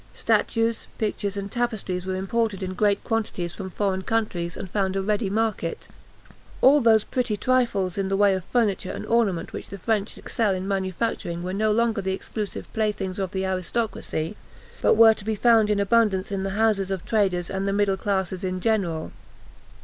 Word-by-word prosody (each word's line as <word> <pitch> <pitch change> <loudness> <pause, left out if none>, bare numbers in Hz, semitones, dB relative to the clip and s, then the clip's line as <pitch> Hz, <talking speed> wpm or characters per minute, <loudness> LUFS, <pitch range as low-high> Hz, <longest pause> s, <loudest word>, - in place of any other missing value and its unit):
Statues, 230 0 +1
pictures, 205 -2 -2
and 200 0 -4
tapestries 215 -7 -2
were 190 - -1
imported 200 +1 -1
in 185 0 -3
great 200 +1 +1
quantities 210 -7 -2
from 190 -2 -6
foreign 190 -1 -1
countries, 185 -5 -2
and - - -5
found 190 0 -1
a 195 - +1
ready 210 0 0
market. 215 -5 -1 0.7
All 285 +2 +6
those 220 -3 +5
pretty 240 -5 -1
trifles 205 -7 +1
in 195 -1 -1
the 195 - +1
way 200 -1 +5
of 190 -1 -2
furniture 210 -6 0
and - - -5
ornament 215 -7 +1
which - - -7
the 200 - -7
French 210 +1 -1
excel 210 -4 0
in 185 +1 -4
manufacturing 190 -2 -2
were 185 +1 -3
no 215 +2 +1
longer 230 -1 +1
the 190 0 -1
exclusive 210 +1 -5
playthings 205 -4 -1
of 190 -1 -1
the 190 +1 -2
aristocracy, 190 -2 -2 0.5
but - - +4
were 225 0 +8
to 215 - -11
be 220 +1 -1
found 225 -1 +4
in 210 -1 +2
abundance 200 -2 +2
in 195 -1 -1
the 195 - -2
houses 215 -4 +2
of 190 -2 -3
traders 190 -5 +1
and 195 0 -2
the - - +1
middle 200 -1 +2
classes 190 -2 -2
in 185 0 -2
general. 180 -7 0
200 Hz, 185 wpm, -25 LUFS, 190-220 Hz, 0.7 s, were